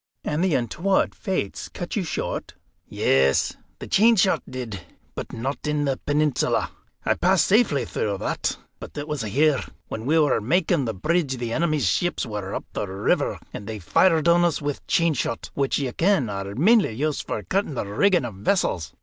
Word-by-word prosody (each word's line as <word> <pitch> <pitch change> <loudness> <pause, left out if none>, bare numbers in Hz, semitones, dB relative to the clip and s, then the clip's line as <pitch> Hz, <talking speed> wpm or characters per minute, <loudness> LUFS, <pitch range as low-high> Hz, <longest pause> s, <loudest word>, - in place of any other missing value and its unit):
'" - - -56
"And 150 +4 -1
the 185 -5 +2
untoward 165 - +1
Fates 185 - -3
cut 175 - -6
you 205 - 0
short?" 155 -2 -4 0.3
"Yes, 65 0 +2 0.2
the - - -8
chain 230 +3 +5
shot 190 -1 +3
did, 120 -7 -6 0.3
but - - -6
not 135 +6 -4
in 150 -1 0
the 135 -2 0
Peninsula. 145 -2 0 0.3
I - - +3
passed 185 -3 +3
safely 200 - +3
through 100 -2 -2
that, - - -2 0.2
but - - -10
it 145 +1 -4
was 150 -3 -3
here. 140 +7 +2 0.3
When 110 +3 -5
we 160 +3 +3
were 150 -7 +3
makin' 165 - +1
the 110 -3 -3
bridge, 150 - 0
the 120 -1 -3
enemy's 155 -5 +1
ships 175 - 0
were 105 -3 -5
up - - -4
the 105 - -2
river, 95 +1 0 0.2
and 105 - -7
they 110 -1 -4
fired 160 - +3
on 170 +1 +5
us 170 -3 +1
with 145 -1 -4
chain 165 -1 +3
shot, 115 -3 -3
which 140 -1 0
ye 135 -3 -2
ken 165 - +1
are 100 0 -5
mainly 200 - +4
used 150 +5 -2
for 105 - -3
cutting 190 -6 -1
the - - -2
rigging 170 - +2
of 115 - -5
vessels. 95 - -1
145 Hz, 190 wpm, -24 LUFS, 110-170 Hz, 0.3 s, chain